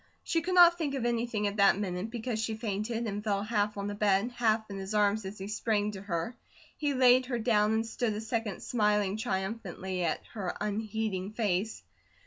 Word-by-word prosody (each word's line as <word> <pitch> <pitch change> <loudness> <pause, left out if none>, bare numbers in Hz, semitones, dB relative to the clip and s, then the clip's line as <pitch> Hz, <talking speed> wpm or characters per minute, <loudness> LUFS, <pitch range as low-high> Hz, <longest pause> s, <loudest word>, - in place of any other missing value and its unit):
She 330 - 0
could 365 +2 -1
not 345 -1 +8
think 290 -4 -1
of 255 -3 -2
anything 235 -3 0
at 205 +1 -1
that 200 -1 +5
minute, 190 0 -3
because 230 -1 -3
she 220 0 -1
fainted, 220 +2 -2
and 205 -1 -3
fell 200 -2 0
half 210 -1 0
on 200 - -3
the 205 - -3
bed, 205 +2 +2
half 225 -2 +1
in 195 - -5
his 195 +2 -4
arms 205 0 +2
as 195 +2 -6
he 195 - -6
sprang 210 -1 0
to 195 -2 -8
her. 190 +3 -3 0.4
He 290 -2 -1
laid 255 0 +5
her 245 -2 -1
down, 220 -2 +2
and 220 +1 +1
stood 225 -1 -1
a - - -3
second 225 -3 -3
smiling 210 -3 +1
triumphantly 190 -4 -3
at 165 - -1
her 195 -6 -4
unheeding 210 -2 -2
face. 215 -1 -1
215 Hz, 200 wpm, -30 LUFS, 200-230 Hz, 0.4 s, not